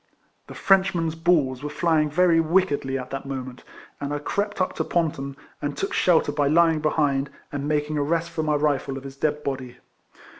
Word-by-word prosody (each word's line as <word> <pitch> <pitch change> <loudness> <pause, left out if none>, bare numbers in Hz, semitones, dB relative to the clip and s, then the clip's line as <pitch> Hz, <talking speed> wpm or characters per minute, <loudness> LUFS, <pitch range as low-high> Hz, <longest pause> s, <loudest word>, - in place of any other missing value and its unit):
The - - -10
Freilchmen's 190 -5 +2
balls 160 -6 +1
were 150 - -4
fly 160 0 +2
ing 150 - 0
very 170 +2 +4
wickedly 155 -5 +1
at 130 -1 -7
that 135 0 -5
moment; 130 -2 -6 0.4
and 145 0 -4
I 145 - -1
crept 205 +8 -2
up 185 - 0
to - - +1
Ponton, 140 -5 -2 0.2
and 145 -1 -3
took - - -2
shelter 165 -4 +3
by 145 -1 +1
lying 165 +1 +4
behind, 145 -3 +1 0.2
and 145 0 -3
making 150 0 0
a - - +1
rest 165 +3 -1
for 165 - -2
my 155 -1 +1
rifle 145 -2 0
of 135 - -8
his 135 -1 -9
dead 150 +1 -1
body. 130 -2 -4
150 Hz, 195 wpm, -24 LUFS, 140-165 Hz, 0.4 s, very